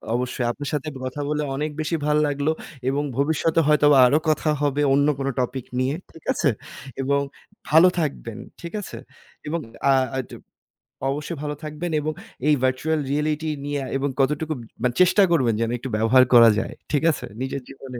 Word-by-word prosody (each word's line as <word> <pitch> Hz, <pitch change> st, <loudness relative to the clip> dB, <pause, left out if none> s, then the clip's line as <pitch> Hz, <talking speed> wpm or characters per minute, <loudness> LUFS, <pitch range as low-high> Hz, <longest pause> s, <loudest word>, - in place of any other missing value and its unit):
অবশ্যই 125 Hz, 0 st, -2 dB
আপনার 145 Hz, +3 st, -6 dB
সাথে 150 Hz, +1 st, -1 dB
একটু 135 Hz, -3 st, -9 dB
কথা 145 Hz, +3 st, -5 dB
বলে 150 Hz, 0 st, 0 dB
অনেক 150 Hz, +2 st, -2 dB
বেশি 155 Hz, +2 st, -1 dB
ভাল 150 Hz, 0 st, +2 dB
লাগলো। 145 Hz, +2 st, 0 dB, 0.4 s
এবং 145 Hz, +2 st, 0 dB
ভবিষ্যতে 160 Hz, +3 st, +1 dB
হয়তোবা 150 Hz, -1 st, +5 dB
আরো 145 Hz, -, +3 dB
কথা 155 Hz, 0 st, +1 dB
হবে 145 Hz, 0 st, +1 dB
অন্য 145 Hz, +1 st, +3 dB
কোন 135 Hz, -, -2 dB
টপিক 125 Hz, 0 st, -2 dB
নিয়ে। 130 Hz, +3 st, 0 dB, 0.2 s
ঠিক 165 Hz, -, -16 dB
আছে? 145 Hz, -, +1 dB, 0.5 s
এবং 140 Hz, +1 st, +1 dB, 0.5 s
ভালো 160 Hz, +4 st, +7 dB
থাকবেন। 130 Hz, -7 st, -3 dB, 0.2 s
ঠিক 170 Hz, +2 st, -7 dB
আছে? -, -, -8 dB, 0.5 s
এবং 165 Hz, +3 st, -1 dB, 0.3 s
আ -, -, +7 dB, 0.2 s
আ -, -, -1 dB
টু -, -, -9 dB, 0.7 s
অবশ্যই 150 Hz, +3 st, -3 dB
ভালো 150 Hz, 0 st, -3 dB
থাকবেন 155 Hz, +3 st, -4 dB
এবং 155 Hz, +1 st, -2 dB, 0.3 s
এই 150 Hz, -, +5 dB
virtual 150 Hz, +5 st, 0 dB
reality 150 Hz, +2 st, -1 dB, 0.2 s
নিয়ে 145 Hz, -1 st, -2 dB, 0.2 s
এবং 140 Hz, +1 st, -1 dB
কতটুকু 150 Hz, +3 st, +1 dB, 0.3 s
মানে 125 Hz, -1 st, +2 dB
চেষ্টা 195 Hz, +3 st, +5 dB
করবেন 130 Hz, -8 st, +3 dB
যেন 115 Hz, -, 0 dB
একটু 130 Hz, +2 st, -6 dB
ব্যবহার 115 Hz, +4 st, +5 dB
করা 115 Hz, -1 st, +9 dB
যায়। -, -, -4 dB, 0.2 s
ঠিক 150 Hz, 0 st, +1 dB
আছে? 130 Hz, -, -5 dB, 0.2 s
নিজের 135 Hz, +1 st, -3 dB
জীবনে। 135 Hz, -2 st, -9 dB
145 Hz, 175 wpm, -23 LUFS, 135-155 Hz, 0.7 s, করা